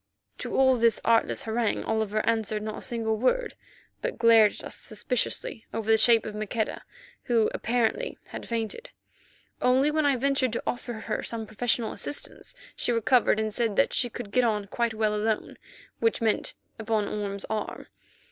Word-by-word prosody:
To - - -4
all 260 -1 +5
this 230 -2 +3
artless 230 -1 +3
harangue 225 0 0
Oliver 215 -1 0
answered 220 -2 0
not 215 0 -4
a - - -11
single 225 -3 -1
word, 260 - +1 0.5
but - - -3
glared 225 -3 +6
at - - -10
us - - -6
suspiciously 225 0 -3
over 225 -1 0
the - - +7
shape 230 0 +5
of 215 - -5
Maqueda, 215 +1 -2 0.4
who 230 -3 +2
apparently 245 - 0
had - - -7
fainted. 230 - -3 0.7
Only 260 +4 +4
when 305 -1 +2
I 280 - +3
ventured 260 -1 +1
to - - -2
offer 245 0 -3
her 220 - -3
some 225 -1 -4
professional 220 +1 -1
assistance 290 - -4 0.2
she - - -1
recovered, 230 -1 +3
and 215 -1 -1
said 225 -2 0
that 275 - +3
she 245 - +1
could 220 -3 -7
get 250 +2 +3
on 210 -3 +1
quite 230 +2 -1
well 215 -1 +1
alone, 215 +1 -2 0.4
which 225 -1 +2
meant 225 -2 0 0.2
upon 220 -2 0
Orme's 200 -1 -4
arm. 215 -1 -4
225 Hz, 170 wpm, -27 LUFS, 215-245 Hz, 0.7 s, the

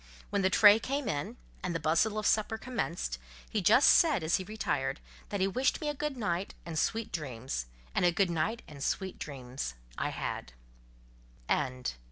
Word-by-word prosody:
When 200 - +1
the 190 - +3
tray 205 +2 +8
came 275 +3 -2
in, 185 +11 -2 0.2
and 175 -2 -2
the - - 0
bustle 165 +8 +2
of 215 - -2
supper 220 +1 +2
commenced, 195 - -3 0.3
he 215 - -1
just 220 +9 +6
said, 305 - +5
as 155 - +3
he 185 - -4
retired, 145 -10 -2 0.3
that 200 -2 -2
he 190 - +4
wished 255 +7 +1
me 300 - -2
a - - -1
good 295 -1 -3
night 195 -4 -2
and 165 -2 -2
sweet 225 -1 -1
dreams; 130 - -4 0.3
and - - +1
a 175 - +5
good 180 +1 +2
night 210 +8 -1
and 140 -2 -8
sweet 190 +4 -2
dreams 130 - -5 0.2
I - - 0
had. - - -4
190 Hz, 180 wpm, -31 LUFS, 155-220 Hz, 0.3 s, tray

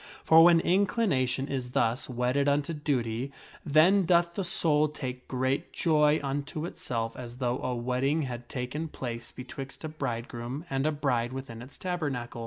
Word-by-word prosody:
For 160 0 +7
when 170 -1 +7
inclination 170 - +1
is 130 -3 -3
thus 120 +3 +1
wedded 125 +3 +1
unto 145 +3 +1
duty, 130 -4 -1 0.3
then 170 +6 +5
doth 170 0 +3
the 195 - -2
soul 155 -3 +2
take 130 -4 -6
great 130 +4 -1
joy 150 -2 +3
unto 145 +3 -3
itself 115 -8 -3
as 120 -1 -8
though 125 -1 -1
a 125 -1 -2
wedding 130 +6 0
had 120 -2 -6
taken 135 +5 -3
place 120 -6 -6
betwixt 135 +2 -8
a - - -2
'bridegroom 120 0 -4
and 135 +2 +1
a - - +2
bride 130 -5 0
within 130 -4 -7
its 130 +3 -10
tabernacle. 145 -10 -3
135 Hz, 160 wpm, -29 LUFS, 125-155 Hz, 0.3 s, For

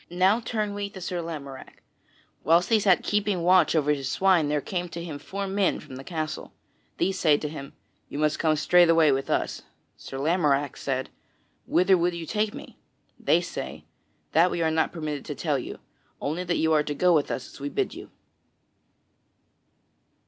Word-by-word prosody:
Now 185 +5 +3
turn 215 -3 -2
we 200 0 -4
to 195 - -10
Sir 180 -1 -3
Lamorack: 140 -5 -8 0.6
whilst 170 +4 +3
he 225 -2 +4
sat 195 -3 +3
keeping 205 -4 0
watch 180 0 +4
over 150 -2 +2
his 135 -2 -3
swine 185 -6 +3
there 150 0 +1
came 180 +3 -4
to 170 0 -6
him 155 -4 -6
four 200 +5 -5
men 195 0 0
from 140 -4 -11
the 135 - -8
castle. 155 -1 -5 0.4
These 190 +2 0
say 150 -3 +4
to 150 - -4
him, 140 -2 -8 0.4
"You - - -6
must 150 0 +1
come 155 -2 +2
straightway 165 -1 +5
with 135 0 -1
us." - - -1 0.4
Sir 135 - -8
Lamorack 145 -2 +1
said, 130 -1 -3 0.6
"Whither 185 0 +4
would 175 +1 +1
you 170 -1 -5
take 210 +4 -1
me?" - - -11 0.4
They - - +3
say: - - -6 0.5
"That 170 +3 +4
we 170 -1 -1
are 160 - +2
not 160 0 +1
permitted 155 -4 -4
to - - -5
tell - - -1
you, - - -7 0.4
only 160 +5 -2
that 175 -1 0
you 160 0 +2
are 155 - +4
to 145 0 -4
go 180 +3 +4
with 150 -3 +2
us 125 - -4
as - - -13
we 140 +1 -4
bid - - -1
you." - - -10
165 Hz, 185 wpm, -26 LUFS, 150-185 Hz, 0.6 s, straightway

